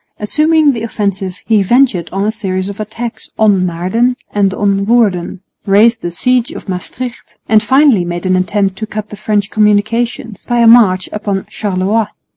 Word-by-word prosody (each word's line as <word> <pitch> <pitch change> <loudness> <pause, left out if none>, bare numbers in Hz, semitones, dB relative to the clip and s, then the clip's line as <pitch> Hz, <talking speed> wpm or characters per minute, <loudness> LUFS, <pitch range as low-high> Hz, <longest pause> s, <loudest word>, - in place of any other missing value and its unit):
Assuming 305 +7 +2
the 230 - -5
offensive, 200 -4 -3
he 220 -3 +3
ventured 235 -3 +2
on 195 +1 -2
a 215 - +1
series 190 -3 -3
of 200 - -8
attacks 225 +2 -6
on 200 -4 +3
Naarden 185 +9 0 0.2
and 200 -2 +2
on 200 0 0
Woerden, 200 -7 +1 0.3
raised 220 +4 +4
the 175 - -3
siege 250 - 0
of 330 - -9
Maestricht, 235 +6 -6
and 220 -1 +4
finally 260 -2 +3
made 175 +1 -5
an 185 0 +2
attempt 195 +1 0
to 220 - -5
cut 210 -1 -6
the - - -6
French 210 0 -1
communications 215 +2 0
by 240 - -1
a 235 - +4
march 215 -6 +5
upon 200 -2 -3
Charleroi. 205 +2 -1
210 Hz, 170 wpm, -14 LUFS, 190-230 Hz, 0.3 s, march